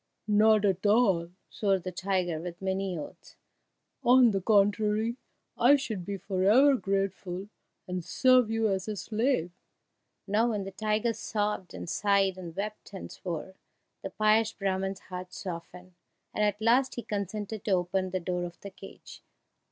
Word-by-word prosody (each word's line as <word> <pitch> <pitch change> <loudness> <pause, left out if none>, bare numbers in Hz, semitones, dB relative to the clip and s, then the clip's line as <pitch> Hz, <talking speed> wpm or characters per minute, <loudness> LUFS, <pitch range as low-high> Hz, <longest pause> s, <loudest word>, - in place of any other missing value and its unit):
"Not 215 0 +4
at 195 -1 +1
all!" 205 -6 +3 0.2
swore 200 -2 +1
the 185 0 -6
tiger 180 -3 -1
with 175 0 -7
many 190 -1 -2
oaths; 150 - -10 0.7
"on 250 -1 +6
the 195 -1 -1
contrary, 210 +3 +2 0.4
I 255 +5 +6
should 220 -10 -4
be 200 -1 -3
for 190 0 -3
ever 260 +9 +6
grateful, 195 -3 -2 0.4
and 180 -1 -3
serve 255 +3 +4
you 225 0 +1
as 190 -1 -1
a 215 - -3
slave!" 220 -3 -1 0.7
Now 215 +4 +2
when 210 -3 -2
the 195 - -7
tiger 215 +3 0
sobbed 210 -3 -3
and - - -7
sighed 195 0 +2
and 170 -3 -8
wept 210 +1 -6
and 190 - -7
swore, 175 +1 -6 0.5
the - - -5
pious 215 +1 +2
Brahman's 195 -1 -2
heart 180 0 -8
softened, 180 0 -8 0.4
and 210 - 0
at 210 -1 +1
last 245 +4 +3
he 240 - -5
consented 205 +1 -4
to 210 - -1
open 185 +1 0
the 185 0 -2
door 180 0 -2
of 175 - -9
the 200 - -8
cage. 195 +1 -13
200 Hz, 160 wpm, -29 LUFS, 185-215 Hz, 0.7 s, on